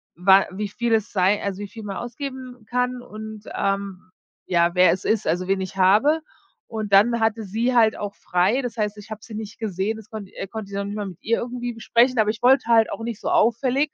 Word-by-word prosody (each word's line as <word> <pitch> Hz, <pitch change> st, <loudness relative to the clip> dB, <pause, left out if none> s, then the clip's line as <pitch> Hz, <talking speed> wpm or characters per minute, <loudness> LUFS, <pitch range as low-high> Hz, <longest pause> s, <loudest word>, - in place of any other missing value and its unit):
wa 190 Hz, +2 st, +5 dB
wie 205 Hz, +2 st, -3 dB
viel 235 Hz, +3 st, -1 dB
es 220 Hz, -1 st, +1 dB
sei, 195 Hz, +2 st, +2 dB
also 200 Hz, -1 st, -3 dB
wie 205 Hz, -, -5 dB
viel 220 Hz, +2 st, -10 dB
man 195 Hz, -2 st, -5 dB
ausgeben 255 Hz, -1 st, -7 dB
kann 250 Hz, 0 st, -1 dB
und, 215 Hz, -2 st, -9 dB
ähm, 195 Hz, -2 st, -2 dB, 0.4 s
ja, 170 Hz, 0 st, +2 dB
wer 180 Hz, 0 st, +6 dB
es 185 Hz, -, -3 dB
ist, 220 Hz, -1 st, +1 dB
also 180 Hz, +2 st, 0 dB
wen 195 Hz, 0 st, +1 dB
ich 190 Hz, +1 st, -6 dB
habe. 220 Hz, +13 st, +4 dB, 0.5 s
Und 215 Hz, -3 st, -5 dB
dann 235 Hz, +4 st, +5 dB
hatte 225 Hz, 0 st, +1 dB
sie 230 Hz, +6 st, 0 dB
halt 225 Hz, -2 st, +4 dB
auch 205 Hz, -1 st, -5 dB
frei. 190 Hz, +8 st, +1 dB
Das 245 Hz, -2 st, -5 dB
heißt, 210 Hz, -1 st, -1 dB
ich 215 Hz, +2 st, -13 dB
hab 215 Hz, -1 st, -8 dB
sie 225 Hz, -, -11 dB
nicht 215 Hz, 0 st, -7 dB
gesehen, 210 Hz, 0 st, -2 dB
das 220 Hz, -1 st, -12 dB
konnte 210 Hz, -3 st, -8 dB
äh, -, -, -4 dB
konnte 215 Hz, -1 st, -7 dB
ich -, -, -6 dB
noch 200 Hz, -, -1 dB
nicht 205 Hz, +1 st, -5 dB
mal 205 Hz, -2 st, -3 dB
mit 180 Hz, -, -9 dB
ihr 230 Hz, +1 st, +1 dB
irgendwie 245 Hz, 0 st, -4 dB
besprechen, 235 Hz, +2 st, +2 dB
aber 215 Hz, -, +3 dB
ich 220 Hz, +2 st, -4 dB
wollte 260 Hz, 0 st, +5 dB
halt 225 Hz, -2 st, +4 dB
auch -, -, -5 dB
nicht 230 Hz, -2 st, -4 dB
so -, -, -3 dB
auffällig 255 Hz, +6 st, +2 dB
215 Hz, 235 wpm, -23 LUFS, 195-235 Hz, 0.5 s, wer